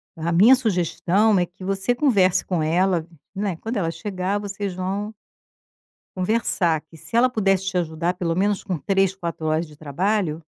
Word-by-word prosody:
A 165 +1 -2
minha 215 +10 +7
sugestão 200 -1 +1
é 175 - +2
que 180 +2 -15
você 195 +5 0
converse 205 -10 +3
com 170 -4 -1
ela, 175 +1 +1 0.3
né, 195 -3 -2
quando 225 +4 -4
ela 165 -4 0
chegar 195 +1 -3
vocês 200 -1 -4
vão 195 +4 -3 1.0
conversar, 185 -5 +1
que 165 - -14
se 230 - -5
ela 250 +2 +5
pudesse 195 -4 +1
te 180 - -1
ajudar 165 +1 -1
pelo 170 -2 -2
menos 200 +1 +1
com 185 -5 -3
3, 195 +2 +1
4 170 -3 -5
horas 155 +2 0
de 150 -1 -16
trabalho 165 +2 -1
185 Hz, 170 wpm, -23 LUFS, 170-205 Hz, 1.0 s, minha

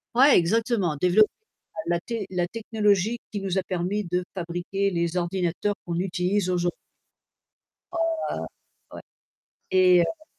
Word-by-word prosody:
Ouais, 270 +3 +7
exactement, 195 - +1
développer 180 +6 +4 0.6
la 175 - +1
la - - -11
té 225 0 -4
la 175 -1 -1
technologie 215 -1 +1
qui 205 -2 -4
nous 195 -1 -1
a 190 - +1
permis 185 +3 -2
de 180 0 0
fabriquer 180 +2 -2
les 170 -1 -1
ordinateurs 180 +3 -1
qu'on 170 0 -2
utilise 185 +1 0
aujour 175 -1 +1 1.2
Ah. 345 - -4 1.0
Ouais. - - -8 0.7
Et 185 -1 +6
heu 310 - -4
185 Hz, 135 wpm, -25 LUFS, 175-210 Hz, 1.2 s, Ouais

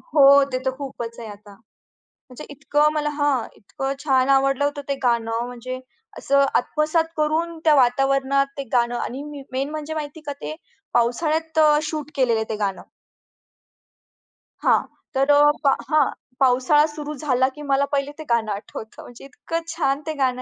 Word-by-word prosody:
हो, 280 -1 +8
ते 255 - 0
तर 260 - +2
खूपच 240 -5 -7
आहे 230 - -7
आता. 205 0 -12 0.8
म्हणजे 250 - -10
इतकं 290 +2 +1
मला 300 -1 -1
हां, 290 -5 +1
इतकं 270 +7 -4
छान 265 -2 +2
आवडलं 275 0 +3
होतं 290 0 -2
ते 280 - +1
गाणं, 230 -1 0
म्हणजे 250 +1 -6 0.4
असं 280 0 +3
आत्मसात 310 +5 0
करून 320 +2 0
त्या 310 -2 +6
वातावरणात 270 +1 +2
ते 280 - -3
गाणं 240 -1 +2
आणि 260 +3 -4
मी 295 -2 -8
मेन 270 +2 -2
म्हणजे 310 0 -5
माहितीये 305 0 -6
का 285 - -2
ते 310 - -5 0.4
पावसाळ्यात 315 +7 +1 0.3
शूट 305 -2 -5
केलेलं 245 -5 +2
आहे 220 - -4
ते 220 - -2
गाणं. 195 -1 -4 1.8
हां. - - +5 0.4
तर 270 +2 +2
अ, 290 +1 +6
पा 275 - +6 0.2
हां, 310 -1 +3 0.3
पावसाळा 265 +3 +4
सुरू 300 0 -6
झाला, 260 -3 +2
की 295 - -10
मला 275 +1 +3
पहिले 280 0 0
ते 315 - -7
गाणं 220 -2 0
आठवतं. 220 +3 -7
म्हणजे 245 +2 -13
इतकं 330 +4 -5
छान 275 -3 0
ते 315 - -2
गाणं 255 -1 0
275 Hz, 165 wpm, -22 LUFS, 250-295 Hz, 1.8 s, हो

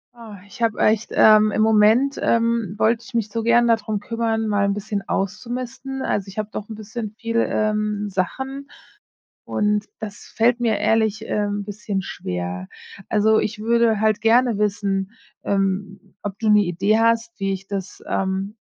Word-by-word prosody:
Ah, 225 -3 -11
ich 205 +4 -14
habe 225 -2 +1
echt 215 +1 +2
ähm, 215 0 +6
im 215 +1 +1
Moment, 220 +6 +4
ähm, 230 -4 +1
wollte 225 +2 +2
ich 250 0 -12
mich 220 -2 0
so 230 +2 -2
gern 235 +1 +4
da 230 - +4
drum 215 -1 -3
kümmern, 225 +1 -1
mal 205 -1 +1
'n 200 0 0
bisschen 205 0 -3
auszumisten. 245 +6 -3
Also, 200 -1 -1
ich 195 - -11
habe 215 -1 -2
doch 210 +1 -6
'n 220 - -6
bisschen 215 0 -6
viel, 230 0 -2
ähm, 210 -1 -1
Sachen 265 +10 -3 0.8
und 210 0 0 0.2
das 210 -2 -7
fällt 235 +2 +3
mir 225 -4 +1
ehrlich, 220 0 +1
ähm, 205 -1 -1
bisschen 205 -1 -4
schwer. 90 - -5 0.4
Also, 220 +1 +3
ich 215 0 -2
würde 230 -1 +2
halt 215 -1 +2
gerne 230 0 +3
wissen, 200 -1 -1 0.3
ähm, 195 -1 -2
ob 200 -1 -5
du 220 - 0
'ne 210 -1 +5
Idee 190 +5 +1
hast, 230 0 +2
wie 195 -1 -1
ich 195 0 -6
das, 195 -2 -5
ähm 195 +2 -2
215 Hz, 170 wpm, -22 LUFS, 200-230 Hz, 0.8 s, ähm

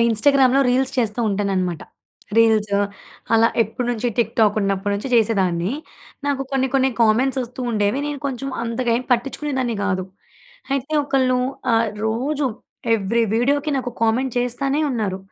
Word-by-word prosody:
ఇన్స్టాగ్రామ్‌లో 265 +3 +4
రీల్స్ 260 +1 +1
చేస్తూ 225 -1 0
ఉంటాననమాట. 190 -4 -1 0.6
రీల్స్ 220 -2 +3 0.6
అలా 225 +1 +5
ఎప్పటి 235 +3 -4
నుంచి 245 0 -1
టిక్‌టాక్ 220 -2 +2
ఉన్నప్పటి 195 0 -1
నుంచి 205 +6 -4
చేసేదాన్ని. 195 -4 +2 0.5
నాకు 280 -1 0
కొన్ని, 265 -1 +1
కొన్ని 265 0 +3
కామెంట్స్ 250 +5 +3
వస్తూండేవి, 240 -2 -1
నేను 290 -1 -4
కొంచెం 270 0 -4
అంతగేమి 235 +1 -1
పట్టించుకునేదాన్ని 260 0 -1
గాదు. 185 -2 -1 0.7
అయితే 275 +2 -2
ఒకళ్ళు 260 -2 +2 0.3
ఆహ్, 225 -1 +3 0.2
రోజు 275 +6 -1 0.5
ఏవ్రి 225 +2 +1
వీడియోకి 285 +6 +1
నాకు 255 -2 -2
కామెంట్ 235 +3 +1
చేస్తనే 270 +4 0
ఉన్నారు. 210 -7 -2
235 Hz, 125 wpm, -21 LUFS, 215-265 Hz, 0.7 s, అలా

